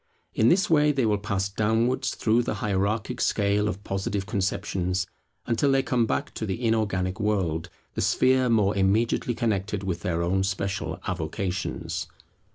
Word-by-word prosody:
In - - +4
this 190 +3 +3
way 150 -2 +4
they 135 -4 +1
will 105 -2 +2
pass 100 -1 -1
downwards 110 +5 0
through 115 +2 +2
the 115 - -2
hierarchic 105 +4 -1
scale 105 0 +2
of 100 0 -4
Positive 95 0 -2
conceptions, 95 -3 -1 0.4
until 135 +4 +2
they 135 0 +3
come 120 -4 +1
back 145 - -2
to 110 - -4
the 95 +3 -2
inorganic 100 -4 0
world, 95 -7 0 0.2
the - - -2
sphere 130 -1 +3
more 105 -3 +3
immediately 110 +5 +1
connected 100 -4 -1
with 90 -3 -2
their 85 -1 -1
own 95 +3 +1
special 100 +1 -2
avocations. 90 0 -3
100 Hz, 155 wpm, -26 LUFS, 95-115 Hz, 0.4 s, In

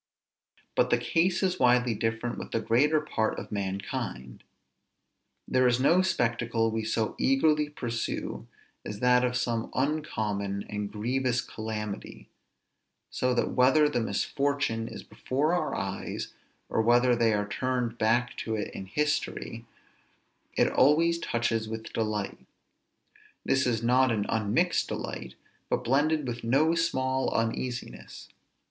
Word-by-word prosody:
But - - +2
the - - +4
case 175 +3 +1
is 185 -1 0
widely 125 -1 +4
different 115 +2 -2
with - - -7
the 115 - -1
greater 140 +8 +3
part 110 -7 -1
of - - -7
mankind; 95 - -4 1.0
there 130 0 +3
is 120 0 +2
no 170 +7 +4
spectacle 120 -8 0
we 110 0 -2
so 110 0 -1
eagerly 150 +2 +3
pursue, 115 - -4 0.4
as 105 -1 -6
that 125 0 +4
of 125 0 +1
some 120 -2 -1
uncommon 110 -9 -1
and 105 -1 -4
grievous 125 +3 0
calamity; 110 -3 -6 0.8
so 125 0 0
that - - 0
whether 135 +4 +5
the 150 - 0
misfortune 115 +1 -1
is - - -8
before 145 +6 -1
our 180 - 0
eyes, - - -4 0.3
or - - +1
whether 120 +2 +4
they 115 -1 +3
are 105 -1 0
turned 125 +1 -2
back 120 +3 +2
to 110 - -2
it 105 - -4
in 95 - -7
history, 120 -2 -2 0.9
it - - +4
always 165 +5 +4
touches 115 -6 -1
with 110 0 -6
delight. 105 -3 -2 1.1
This 135 -1 +2
is 115 -2 0
not 125 +1 +4
an 105 -3 0
unmixed 110 -2 +1
delight, - - -5 0.3
but - - 0
blended 150 +4 +2
with 120 0 -4
no 140 +8 +3
small 130 -6 0
uneasiness. 120 +2 -3
120 Hz, 135 wpm, -28 LUFS, 110-135 Hz, 1.1 s, whether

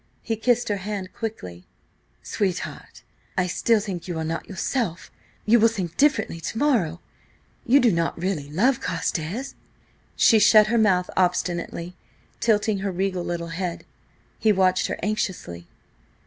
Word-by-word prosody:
He 225 - -1
kissed 245 +2 +1
her 205 - 0
hand 195 -1 -5
quickly 90 - -7 0.6
"Sweetheart!... 190 -4 -4 0.3
I 180 - +2
still 220 +5 +2
think 190 -4 -5
you 175 -2 -3
are 160 - -2
not 165 +1 -4
yourself. 190 -1 -3 0.3
You 235 +2 +5
will 225 - +6
think 185 -7 -4
differently 220 - +1
to 220 - -5
morrow–you 235 - -1
do 245 -4 +4
not 170 -2 -1
really 170 -5 -3
love 235 - +2
Carstares." 200 - -3 0.6
She 225 - +5
shut 215 +1 +7
her - - +4
mouth 185 -4 +2
obstinately, 175 -1 -1 0.4
tilting 215 -2 +2
her 195 0 -2
regal 185 0 -1
little 170 -1 -4
head. 170 0 -4 0.5
He 220 - +4
watched 185 -2 +2
her - - -3
anxiously. 180 - -3
190 Hz, 140 wpm, -24 LUFS, 175-220 Hz, 0.6 s, shut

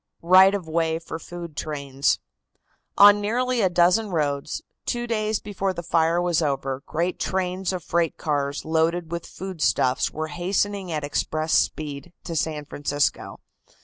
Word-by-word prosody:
RIGHT 190 +3 +7
OF 185 -5 -5
WAY 160 0 0
FOR 165 0 -7
FOOD 170 -2 -8
TRAINS. 140 -3 -1 0.8
On 205 0 +8
nearly 245 +3 0
a 190 - +3
dozen 180 +5 +3
roads, 145 -5 -2 0.2
two 240 0 -2
days 215 -2 -1
before 195 -2 -2
the 170 -1 -6
fire 165 +1 +2
was 175 -2 +1
over, 135 -3 -1
great 175 +3 -1
trains 185 0 -1
of 180 -3 -4
freight 170 0 0
cars 145 -2 -2
loaded 160 +1 0
with 170 -1 -4
foodstuffs 165 -8 0
were 155 +1 -4
hastening 190 +3 -1
at 155 -2 -2
express 155 +2 -1
speed 150 +2 -1
to 165 - -5
San 155 -1 -2
Francisco. 145 0 -2
170 Hz, 145 wpm, -24 LUFS, 155-190 Hz, 0.8 s, On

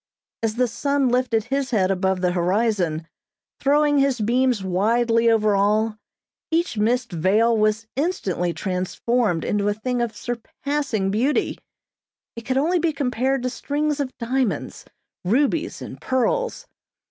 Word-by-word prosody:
As 220 -1 -1
the 250 +1 +2
sun 280 +2 0
lifted 245 -3 +1
his 270 +3 -2
head 195 -5 +2
above 190 0 0
the 180 -1 +2
horizon, 180 -3 0 0.5
throwing 290 +1 +3
his 275 -3 +2
beams 240 0 +1
widely 230 +5 +2
over 215 -2 +3
all, 215 +2 +1 0.5
each 330 -3 0
mist 235 +3 0
veil 200 +8 +2
was 215 +1 +1
instantly 195 - -1
transformed 185 +1 -1
into 205 -1 0
a 205 - -1
thing 245 +3 -2
of 235 -2 -2
surpassing 245 -3 -2
beauty. 250 +8 0 0.8
It 230 -1 -8
could 260 0 0
only 335 +6 +2
be 325 -1 +1
compared 265 -1 0
to 255 - -1
strings 295 +2 -2
of 270 -2 -3
diamonds, 250 -1 -2 0.4
rubies 275 - 0
and - - -9
pearls. 485 - 0
235 Hz, 135 wpm, -23 LUFS, 205-270 Hz, 0.8 s, throwing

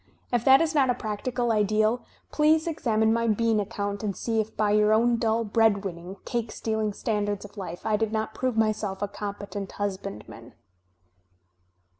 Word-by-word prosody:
If 240 -2 +2
that 270 +2 +7
is 325 -1 +1
not 275 -4 +3
a 245 - +2
practical 235 +3 -2
ideal, 215 +2 +2 0.3
please 310 +1 +3
examine 225 -9 +1
my 230 0 +1
bean 225 0 +2
account 205 -1 -3
and 205 -3 -3
see 225 -1 0
if 220 +1 -9
by 210 -1 +2
your 210 0 +4
own 235 +1 +3
dull 230 0 +1
bread 215 -2 +2
winning, 175 +1 -6
cake 235 -2 -2
stealing 220 -1 -1
standards 205 -2 -2
of 205 - -13
life, 180 -4 -7
I 215 -1 +2
did 220 0 -1
not 220 0 -2
prove 255 -3 -2
myself 215 -3 0
a - - 0
competent 200 -1 -6
husbandman." 190 - -6
220 Hz, 170 wpm, -26 LUFS, 205-230 Hz, 0.3 s, that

